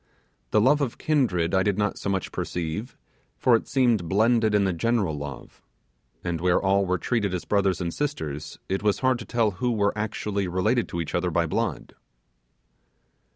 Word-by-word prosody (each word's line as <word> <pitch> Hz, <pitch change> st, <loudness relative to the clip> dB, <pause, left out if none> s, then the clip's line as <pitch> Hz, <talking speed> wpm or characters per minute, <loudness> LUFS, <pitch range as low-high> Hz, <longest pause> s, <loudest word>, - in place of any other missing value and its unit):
The 105 Hz, -, +3 dB
love 140 Hz, +7 st, +4 dB
of 130 Hz, -5 st, -2 dB
kindred 105 Hz, -, +1 dB
I 95 Hz, -, +4 dB
did 100 Hz, 0 st, +1 dB
not 105 Hz, 0 st, -1 dB
so -, -, -3 dB
much 95 Hz, -2 st, -2 dB
perceive, 90 Hz, +8 st, -4 dB, 0.4 s
for 125 Hz, -, +4 dB
it 115 Hz, -, -1 dB
seemed 120 Hz, -10 st, +2 dB
blended 110 Hz, +1 st, +3 dB
in 105 Hz, -, +4 dB
the 95 Hz, -2 st, +1 dB
general 100 Hz, -3 st, 0 dB
love; 70 Hz, -3 st, -8 dB, 0.6 s
and 85 Hz, -2 st, -2 dB
where 90 Hz, 0 st, +3 dB
all 100 Hz, 0 st, +2 dB
were 90 Hz, +1 st, +1 dB
treated 100 Hz, -1 st, -1 dB
as 90 Hz, -, -5 dB
brothers 100 Hz, -3 st, +1 dB
and 85 Hz, -2 st, -3 dB
sisters, 80 Hz, -, -4 dB
it 95 Hz, -, -1 dB
was 105 Hz, -1 st, +1 dB
hard 130 Hz, -2 st, +2 dB
to 115 Hz, -, -7 dB
tell 115 Hz, -3 st, +1 dB
who 120 Hz, +6 st, -1 dB
were 100 Hz, -3 st, +1 dB
actually 105 Hz, -2 st, -2 dB
related 105 Hz, +7 st, +1 dB
to 85 Hz, -, -3 dB
each 80 Hz, -, -6 dB
other 90 Hz, +1 st, 0 dB
by 85 Hz, 0 st, +1 dB
blood. 80 Hz, -, -2 dB
100 Hz, 185 wpm, -25 LUFS, 90-115 Hz, 0.6 s, love